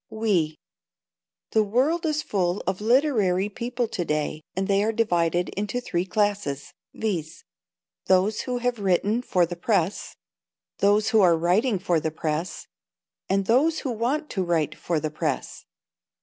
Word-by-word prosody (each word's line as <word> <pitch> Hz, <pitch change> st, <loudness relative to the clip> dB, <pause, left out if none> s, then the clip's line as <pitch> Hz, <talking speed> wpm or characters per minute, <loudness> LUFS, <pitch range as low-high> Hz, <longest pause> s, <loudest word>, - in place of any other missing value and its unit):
"We." 200 Hz, -9 st, 0 dB, 0.9 s
The 220 Hz, -, +4 dB
world 270 Hz, +11 st, +1 dB
is 305 Hz, -1 st, 0 dB
full 180 Hz, -2 st, -1 dB
of 190 Hz, +2 st, -2 dB
literary 215 Hz, -6 st, +2 dB
people 240 Hz, +2 st, -3 dB
to 185 Hz, -, -2 dB
day, 155 Hz, -1 st, -2 dB
and 190 Hz, +1 st, -1 dB
they 200 Hz, 0 st, +2 dB
are 220 Hz, -, +1 dB
divided 175 Hz, -6 st, +1 dB
into 210 Hz, +4 st, -3 dB
three 185 Hz, -7 st, -2 dB
classes, 200 Hz, -9 st, -1 dB, 0.2 s
viz: 170 Hz, -7 st, -4 dB, 0.6 s
Those 190 Hz, +3 st, +3 dB
who 250 Hz, -1 st, -3 dB
have 245 Hz, -1 st, -1 dB
written 200 Hz, +4 st, +1 dB
for 180 Hz, -8 st, +2 dB
the 175 Hz, +1 st, -6 dB
press, 185 Hz, 0 st, -1 dB, 0.6 s
those 205 Hz, +2 st, +3 dB
who 220 Hz, -, +4 dB
are 175 Hz, -3 st, +5 dB
writing 195 Hz, +7 st, +2 dB
for 175 Hz, -3 st, +1 dB
the 160 Hz, -, -2 dB
press, 155 Hz, +2 st, -3 dB, 0.6 s
and 195 Hz, +1 st, +1 dB
those 295 Hz, +9 st, +3 dB
who 265 Hz, -, -2 dB
want 255 Hz, +7 st, -1 dB
to 190 Hz, -, -1 dB
write 160 Hz, -3 st, 0 dB
for 165 Hz, -1 st, -2 dB
the 155 Hz, 0 st, -3 dB
press. 155 Hz, -, -3 dB
200 Hz, 150 wpm, -25 LUFS, 175-230 Hz, 0.9 s, are